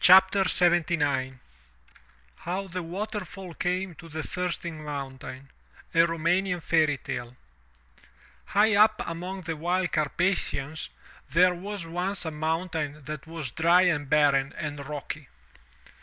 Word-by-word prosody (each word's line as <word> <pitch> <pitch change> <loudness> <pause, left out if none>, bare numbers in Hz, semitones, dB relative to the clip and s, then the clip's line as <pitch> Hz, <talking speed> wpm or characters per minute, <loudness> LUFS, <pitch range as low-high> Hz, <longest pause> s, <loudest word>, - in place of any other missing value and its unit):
375 180 -2 +6
MY 140 -3 +1
BOOK - - -15
HOUSE - - -16 1.1
HOW 190 +3 -2
THE 180 +1 -3
WATERFALL 190 0 -5
CAME 180 +2 -1
TO 165 +2 -13
THE 155 0 -4
THIRSTING 170 -3 -3
MOUNTAIN 135 -2 -6 0.4
A 165 +1 +5
Roumanian 175 +3 +1
Fairy 155 -3 +2
Tale 120 -1 -6 1.2
|IGH 215 +2 +5
up 215 +1 +5
among 180 +3 -5
the 165 -2 -3
wild 175 +3 0
Carpathians 155 -1 0 0.4
there 180 0 +5
was 195 +1 -5
once 180 +3 -2
a 160 - -2
mountain 160 -1 -2
that 150 +1 -6
was 160 -6 -4
dry 170 +5 +5
and 145 -6 +1
barren 140 -2 +3
and 145 -3 -4
rocky. 150 0 -6
165 Hz, 125 wpm, -27 LUFS, 150-180 Hz, 1.2 s, 375